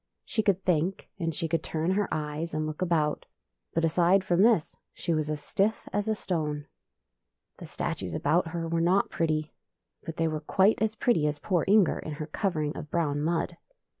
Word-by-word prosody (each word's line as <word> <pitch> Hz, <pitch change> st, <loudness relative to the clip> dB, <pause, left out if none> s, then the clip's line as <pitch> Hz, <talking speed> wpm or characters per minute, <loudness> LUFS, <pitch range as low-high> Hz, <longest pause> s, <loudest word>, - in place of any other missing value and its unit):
She 220 Hz, -, 0 dB
could 195 Hz, -3 st, +1 dB
think, 180 Hz, +1 st, 0 dB
and 165 Hz, -3 st, -1 dB
she 165 Hz, +1 st, -1 dB
could 165 Hz, +1 st, 0 dB
turn 160 Hz, +3 st, -1 dB
her 205 Hz, +1 st, +1 dB
eyes 155 Hz, +2 st, -3 dB
and 155 Hz, 0 st, 0 dB
look 155 Hz, +2 st, -5 dB
about, 160 Hz, -4 st, +1 dB, 0.5 s
but 165 Hz, 0 st, +3 dB
aside 175 Hz, +4 st, +3 dB
from 180 Hz, -1 st, +2 dB
this 215 Hz, -7 st, +3 dB, 0.2 s
she 170 Hz, -, -1 dB
was 155 Hz, -1 st, 0 dB
as 150 Hz, -1 st, -3 dB
stiff 210 Hz, +3 st, 0 dB
as 205 Hz, +1 st, 0 dB
a 220 Hz, -, +1 dB
stone. 150 Hz, -7 st, -2 dB, 0.9 s
The -, -, -8 dB
statues 90 Hz, -3 st, -3 dB
about 165 Hz, +4 st, +2 dB
her 165 Hz, 0 st, -3 dB
were 165 Hz, 0 st, 0 dB
not 180 Hz, +4 st, +2 dB
pretty, 155 Hz, -2 st, -1 dB, 0.5 s
but 165 Hz, -, -6 dB
they 165 Hz, -, +2 dB
were 155 Hz, -1 st, -2 dB
quite 190 Hz, +8 st, +3 dB
as 220 Hz, 0 st, +1 dB
pretty 215 Hz, -9 st, +2 dB
as 150 Hz, 0 st, -1 dB
poor 175 Hz, +1 st, 0 dB
Inger 200 Hz, -2 st, +4 dB
in 155 Hz, -, -5 dB
her 150 Hz, +1 st, -5 dB
covering 155 Hz, -3 st, -1 dB
of 150 Hz, -, -7 dB
brown 145 Hz, -3 st, 0 dB
mud. 165 Hz, +2 st, -1 dB
165 Hz, 195 wpm, -28 LUFS, 155-190 Hz, 0.9 s, Inger